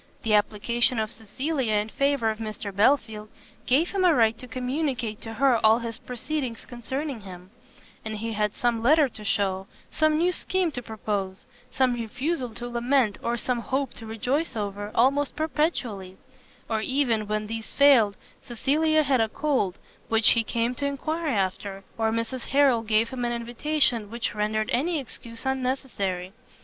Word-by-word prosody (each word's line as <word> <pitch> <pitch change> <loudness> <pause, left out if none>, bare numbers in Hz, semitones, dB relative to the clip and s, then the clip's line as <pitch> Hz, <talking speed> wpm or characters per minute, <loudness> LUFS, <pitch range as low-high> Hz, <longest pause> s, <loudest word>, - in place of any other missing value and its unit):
The 225 -3 +1
application 225 +4 +2
of 220 0 -1
Cecilia 240 +3 -2
in 210 +1 0
favour 275 -4 +1
of 215 - -7
Mr 215 -3 -5
Belfield 220 -2 +2 0.4
gave 295 +8 +3
him 390 -2 0
a 350 -4 +5
right 225 -2 +4
to 255 - -9
communicate 250 -2 -2
to 225 - -7
her 245 0 +3
all 220 +1 +6
his 230 -2 -5
proceedings 250 -1 -4
concerning 260 +1 -5
him; 185 -1 -11 0.5
and 220 -1 -4
he 225 +2 -3
had 210 -1 0
some 235 -2 0
letter 295 +5 +5
to 215 -2 -11
shew, 195 -2 0 0.2
some 310 0 +2
new 350 +3 +3
scheme 365 -1 0
to 245 - -4
propose, 205 -4 -4 0.2
some 255 -1 +2
refusal 250 +4 -2
to 240 0 -5
lament, 240 -2 +1
or 235 0 -1
some 245 +1 -1
hope 265 +3 -2
to 225 - -10
rejoice 250 +9 -1
over, 205 -1 -3
almost 275 +4 +3
perpetually: 250 - -1 0.5
or 220 -1 -1
even 240 -4 +1
when 215 0 -1
these 225 +1 -5
failed, 255 -8 +5 0.3
Cecilia 305 +5 +2
had 265 -4 +2
a 220 - +1
cold, 255 - 0 0.3
which 225 -1 +4
he 230 - +3
came 230 +2 -1
to 280 +3 -3
enquire 310 +4 -2
after, 195 -4 -2
or 225 -1 +1
Mrs 230 +2 -2
Harrel 270 -4 +4
gave 225 +1 +2
him 250 -1 -4
an 240 0 0
invitation, 240 -1 0
which 235 0 -3
rendered 215 +2 -1
any 315 +8 +1
excuse 230 -2 -9
unnecessary. 250 -9 -2
235 Hz, 165 wpm, -26 LUFS, 215-275 Hz, 0.5 s, all